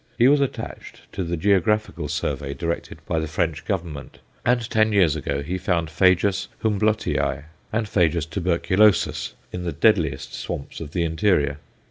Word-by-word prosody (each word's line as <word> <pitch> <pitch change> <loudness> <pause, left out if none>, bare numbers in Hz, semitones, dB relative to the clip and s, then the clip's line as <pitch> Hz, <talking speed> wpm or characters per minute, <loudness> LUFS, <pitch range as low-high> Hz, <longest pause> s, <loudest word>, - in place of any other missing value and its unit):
He 120 +1 +6
was 145 +1 +5
attached 140 - -5
to 95 - -3
the 85 0 -2
geographical 105 +4 +1
survey 70 -1 -3
directed 85 -1 -3
by 80 - 0
the 80 - -2
French 80 -1 -2
Government, 85 -8 -4 0.3
and 120 -1 +2
ten 110 -2 +2
years 90 -7 +4
ago 70 0 -2
he 90 +5 -3
found 85 -4 0
Phajus 95 +3 +3 0.2
Humblotii 105 -9 0 0.3
and 110 0 -1
Phajus 85 -5 +2
tuberculosus 95 +4 +2 0.2
in 90 - -5
the 90 -1 -2
deadliest 80 -4 +1
swamps 70 - -6
of 75 -2 -7
the 85 - +1
interior. 80 -4 +1
90 Hz, 150 wpm, -23 LUFS, 80-105 Hz, 0.3 s, He